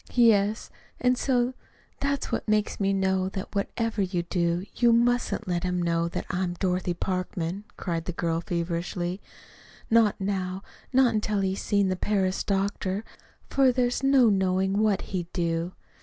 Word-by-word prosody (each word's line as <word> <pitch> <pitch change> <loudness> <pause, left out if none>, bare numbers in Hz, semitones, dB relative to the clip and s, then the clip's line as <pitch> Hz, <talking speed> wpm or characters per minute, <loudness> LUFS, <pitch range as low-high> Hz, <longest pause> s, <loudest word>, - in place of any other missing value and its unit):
"Yes; 220 -3 +3 0.3
and 250 0 +3
so 250 -1 +1 0.5
that's 280 -1 -1
what - - -2
makes 215 -1 +1
me 195 -1 +2
know 190 -1 +1
that 190 +1 -6
whatever 215 +2 -1
you 180 -2 -1
do, 170 +1 0
you 240 -1 +4
mustn't 240 -1 +2
let 175 -1 0
him 180 -1 0
know 170 -1 +1
that 170 - -4
I 180 - -1
am 175 -1 -2
Dorothy 180 -1 -1
Parkman," 185 +1 -3
cried 165 -3 -3
the - - -2
girl 165 -1 -1
feverishly; 175 +2 -3 0.7
"not 225 -3 +4
now 190 -1 -2 0.3
not 260 -3 +4
until 210 -1 0
he's 190 0 -1
seen 200 -2 +2
the 185 - 0
Paris 190 -1 0
doctor, 195 0 -1 0.4
for 270 -2 +4
there's 245 0 0
no 270 -4 +5
knowing 190 0 +1
what 215 -3 +2
he'd 175 -2 -3
do. 170 0 -1
190 Hz, 155 wpm, -27 LUFS, 180-215 Hz, 0.7 s, no